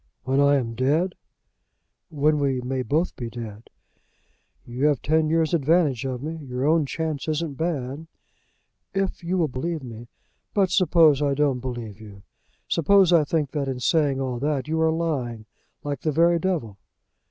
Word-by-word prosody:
"When 135 +2 +1
I 140 0 +5
am 120 -4 -1
dead?" 150 +10 +1 1.0
"When 150 -1 +1
we 135 -2 0
may 130 +1 -2
both 150 +9 0
be 120 -2 -5
dead." 115 -2 -9 1.0
"You 125 +4 -2
have 145 -4 +2
ten 155 +1 +2
years 165 0 +1
advantage 150 -4 +2
of 130 0 -4
me. 160 +2 -4
Your 125 0 -3
own 155 -1 +3
chance 155 -1 -3
isn't 155 -1 -1
bad." 150 -1 -3 0.9
"If 195 -2 -2
you 180 +2 -1
will 165 -3 +2
believe 155 +3 -4
me 120 -1 -9 0.2
" - - -47
"But 195 -3 +2
suppose 165 -6 +4
I 140 -1 +1
don't 140 -3 +1
believe 120 -5 -6
you! 100 -3 -12 0.4
Suppose 185 +2 +4
I 165 -3 +6
think 150 -2 -1
that 145 -3 -2
in 130 -2 -3
saying 140 0 +2
all 130 -3 -2
that 145 0 -1
you 160 +1 0
are 160 - +4
lying 135 -9 -2 0.4
like 145 -3 -4
the 155 - 0
very 170 +3 +3
devil!" 155 - -2
145 Hz, 170 wpm, -24 LUFS, 125-160 Hz, 1.0 s, I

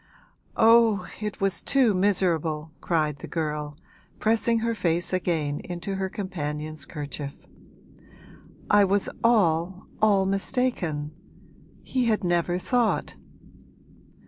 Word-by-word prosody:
'Oh, 225 -4 +5 0.2
it 210 -1 -4
was 195 -4 0
too 260 -6 +3
miserable!' 170 -5 0
cried 155 -4 0
the - - -8
girl, 150 -2 -3 0.4
pressing 225 +1 +2
her 230 - +1
face 175 -4 -1
again 160 -5 -1
into 175 +2 -5
her 190 0 -2
companion's 155 -6 -5
kerchief. 145 -2 -7 1.3
'I 205 -1 +6
was 195 +1 +1
all, 185 -5 +2 0.2
all 200 -3 +4
mistaken; 195 - -1 0.7
he 255 -2 -1
had 215 -3 +1
never 175 0 +1
thought!' 240 +5 0
185 Hz, 105 wpm, -26 LUFS, 155-210 Hz, 1.3 s, I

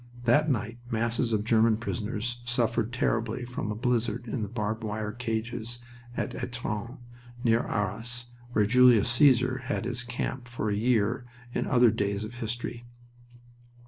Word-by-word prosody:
That 145 +7 +4
night 120 -2 -1
masses 115 +1 0
of 105 -2 +1
German 115 -1 +4
prisoners 115 +1 -3
suffered 120 -1 0
terribly 120 0 0
from 120 -3 -4
a - - -3
blizzard 120 0 0
in 115 +1 -2
the 105 - -3
barbed 110 0 -2
wire 105 0 -2
cages 115 0 -3 0.4
at - - -2
Etrun, 120 -1 -4 0.5
by 115 - +5
Arras, 115 +2 -1 0.3
where 105 -3 +4
Julius 120 -1 +6
Caesar 130 0 +4
had 130 -4 -2
his 120 0 -1
camp 125 +1 -4
for 115 -3 -2
a - - +1
year 115 +1 +1 0.3
in - - -1
other 120 -2 +5
days 100 -1 -1
of 110 +3 -7
history. 120 0 -4
115 Hz, 145 wpm, -28 LUFS, 110-125 Hz, 0.5 s, Julius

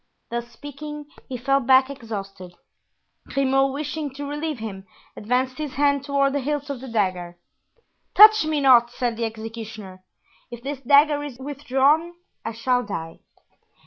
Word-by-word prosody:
Thus 235 0 -3
speaking, 290 +4 -9 0.2
he 255 - -4
fell 275 +3 +2
back 260 0 +4
exhausted. 195 -8 -8 0.7
Grimaud, 270 0 +1
wishing 295 +1 -4
to 285 +1 -5
relieve 295 +1 -3
him, 195 -4 -7 0.3
advanced 255 +5 -1
his 300 -3 -5
hand 280 -1 +2
toward 280 -1 +1
the 285 - 0
hilt 290 +1 -3
of 260 -3 -6
the 265 - -8
dagger. 185 -6 -2 0.8
"Touch 430 -1 +9
me 310 -1 -1
not!" 245 -3 +6
said 240 -1 -2
the 230 0 -2
executioner; 220 -4 -8 0.5
"if 240 0 -10
this 280 0 -4
dagger 290 +2 +4
is 280 -5 -7
withdrawn 285 +4 +1 0.3
I 225 - -3
shall 245 +2 +1
die." 165 -8 -6
265 Hz, 145 wpm, -23 LUFS, 225-285 Hz, 0.8 s, Touch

